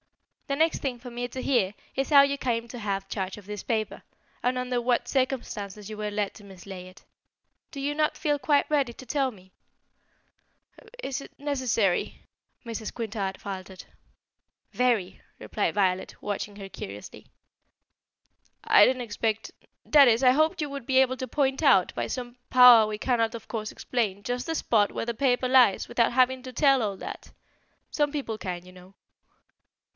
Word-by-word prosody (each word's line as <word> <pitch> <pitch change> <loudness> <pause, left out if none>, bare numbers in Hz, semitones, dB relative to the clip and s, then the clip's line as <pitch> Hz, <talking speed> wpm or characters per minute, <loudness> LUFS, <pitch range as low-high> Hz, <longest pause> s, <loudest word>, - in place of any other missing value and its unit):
The 275 - -1
next 320 +1 +2
thing 255 -4 -3
for 245 +1 -9
me 245 +1 -4
to 260 +2 -6
hear 220 -8 +1 0.2
is 270 0 -1
how 285 -2 +8
you 280 0 0
came 235 -3 -2
to 245 - -8
have 195 -2 -3
charge 190 -1 -4
of 205 - -12
this 210 0 -6
paper, 220 -2 -2 0.4
and 250 +1 +1
under 250 -1 -1
what 245 0 +1
circumstances 215 -6 -2
you 215 - -6
were 210 0 -4
led 205 -1 -2
to 210 - -14
mislay 190 -1 -10
it. 185 - -17 0.6
Do 285 - -8
you 285 +2 -1
not 305 0 0
feel 295 -2 0
quite 285 0 +2
ready 280 -5 +1
to 260 - -12
tell 270 +1 0
me?" 190 -4 -19 1.5
"Is 270 0 -3
is - - -11
that - - -40
necessary?" 255 -10 0 0.4
Mrs. 225 -2 -5
Quintard 210 -4 -4
faltered. 190 -1 -8 0.9
"Very," 235 -7 0 0.2
replied - - -2
Violet, 190 -2 0
watching 205 0 -4
her 195 -1 -7
curiously. 100 - -9 1.4
"I 205 - +7
didn't 255 -1 0
expect 220 0 -2 0.3
that 285 -3 +7
is, 230 0 +4
I 250 - +7
hoped 315 +6 +2
you 300 - -1
would 280 -4 -7
be 260 - +2
able 260 -1 +3
to 260 - -4
point 270 +1 0
out, 195 -11 +4
by - - -3
some 245 -1 -6
power 250 -4 +8
we 215 0 -4
cannot 230 -1 0
of 225 - -9
course 215 -2 -4
explain, 205 -5 -2
just 245 +2 -3
the 325 - -1
spot 210 -8 +2
where - - -4
the 235 - -2
paper 255 0 +1
lies, 250 -6 +4
without 240 -1 +2
having 255 +1 +2
to 255 - -7
tell 275 +1 +3
all 200 -3 -2
that. - - -8 0.6
Some 295 -1 +1
people 270 -7 -4
can, 180 -2 -5
you 180 - -13
know." 185 +1 -16
240 Hz, 180 wpm, -27 LUFS, 205-265 Hz, 1.5 s, how